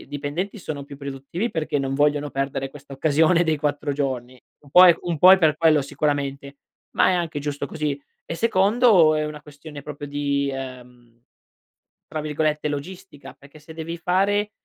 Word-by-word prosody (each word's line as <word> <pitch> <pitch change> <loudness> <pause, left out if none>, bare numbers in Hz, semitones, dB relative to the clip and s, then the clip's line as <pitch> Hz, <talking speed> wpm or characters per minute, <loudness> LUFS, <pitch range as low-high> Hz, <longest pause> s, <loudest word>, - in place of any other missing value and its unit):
i - - -14
dipendenti 145 +9 -4
sono 150 -6 -6
più 140 -1 -11
produttivi 140 - -5
perché 155 -3 -2
non 135 0 -2
vogliono 145 0 +1
perdere 135 0 -3
questa 140 -1 -13
occasione 160 +4 +3
dei 160 -2 +1
4 145 0 -2
giorni. 130 -3 -4 0.2
Un 140 - -19
po' 180 +3 +8
è 175 - +6
un 170 -3 -3
po' 185 +4 +8
è 190 - +6
per 155 -3 +3
quello 155 -2 +4
sicuramente, 140 -1 -3 0.4
ma - - +4
è - - +2
anche 170 -4 -2
giusto 145 0 -4
così. 145 -1 -3 0.2
E - - -5
secondo 200 -4 +4
è 155 0 0
una 150 0 -6
questione 145 0 -11
proprio 145 0 -8
di, 140 -1 -1
ehm, 125 -3 -10 0.9
tra 155 0 -4
virgolette 150 0 -1
"logistica", 145 +1 -8
perché 145 +2 -17
se 160 +2 -13
devi 165 +1 -6
fare, 200 +4 +1
150 Hz, 175 wpm, -23 LUFS, 140-165 Hz, 0.9 s, po